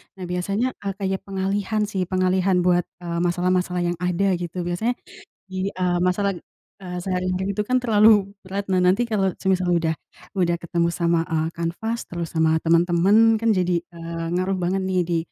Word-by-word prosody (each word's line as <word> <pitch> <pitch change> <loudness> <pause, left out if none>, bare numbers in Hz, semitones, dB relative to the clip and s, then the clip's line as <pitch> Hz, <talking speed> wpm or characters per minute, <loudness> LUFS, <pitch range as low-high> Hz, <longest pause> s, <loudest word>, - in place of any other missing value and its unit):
Nah, 190 - -8
biasanya, 195 +7 -1 0.2
eee, 195 - -1
kayak 190 -1 -2
pengalihan 195 +2 -1
sih, 195 -3 -2
pengalihan 185 0 +2
buat, 175 -1 +2 0.2
eee, 170 -1 -2
masalah-masalah 180 +1 +1
yang 175 - -4
ada, 180 +2 +1
gitu, 175 +1 -4
biasanya 175 +8 -1 0.6
di, 190 0 -2
eee, 180 -2 0
masalah, 180 +3 +1 0.5
eee, 180 -2 -6
sehari-hari, 185 +1 -1
itu 210 - 0
kan 255 +1 +1
terlalu 215 -3 +5 0.2
berat. 195 +1 -4
Nah, 185 - +3
nanti 180 +5 +3
kalau 195 -4 +1
semisal 185 -1 0
udah 160 -2 0 0.4
udah 175 -2 +2
ketemu 170 0 0
sama, 170 -1 +1
eee, 160 -2 -1
kanvas 220 +8 -3
terus 170 -1 -5
sama 160 0 +4
teman-teman, 175 +7 +4
kan, 225 +1 +1
jadi, 180 -4 +1
eee, 165 -1 -7
ngaruh 185 +1 0
banget 185 +2 0
nih, 190 -1 0
di, 170 -1 0
185 Hz, 170 wpm, -23 LUFS, 175-195 Hz, 0.6 s, terlalu